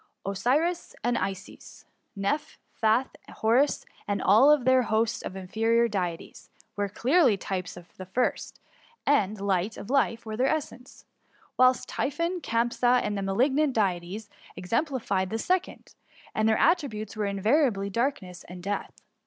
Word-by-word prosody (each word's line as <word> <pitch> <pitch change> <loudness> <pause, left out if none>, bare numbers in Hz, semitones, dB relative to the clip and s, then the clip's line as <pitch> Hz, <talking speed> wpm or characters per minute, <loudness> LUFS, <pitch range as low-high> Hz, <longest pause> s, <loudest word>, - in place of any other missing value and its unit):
Osiris, 280 - 0
Isis, 195 -6 -4 0.3
Cnepb, 200 +10 -2 0.2
Phath, 225 +4 +3 0.2
Horus, 245 +6 +1 0.2
and 205 -1 -1
all 220 +10 +5
tlieir 260 -1 +3
host 220 +1 0
of 185 - -7
inferior 225 +5 +1
deities, 180 -6 -5 0.3
were 205 -1 -1
clearly 255 - +3
types 185 -2 -5
of 175 0 -14
the 185 - -8
first, 245 +7 -2 0.5
and 215 -8 +2
light 195 +1 -1
and 200 - -7
life 230 -5 +1
were 215 -1 -5
their 255 +4 +1
essence; 275 -4 -4 0.5
whilst 255 0 +3
Typhon, 335 +5 -2
Campsa, 240 +1 +2
and 210 - -2
the 200 - -2
malignant 265 +9 +1
deities, 195 0 -1 0.3
exemplified 200 - -1
the 225 - -2
second, 365 +10 -2 0.4
and 220 0 +2
their 220 - +3
attri 335 -5 +3
butes 215 -1 -7
were 210 -1 -1
invariably 200 0 +1
darkness 205 -6 -2
and 180 0 -10
death."" 200 +1 -5
220 Hz, 135 wpm, -27 LUFS, 195-260 Hz, 0.5 s, all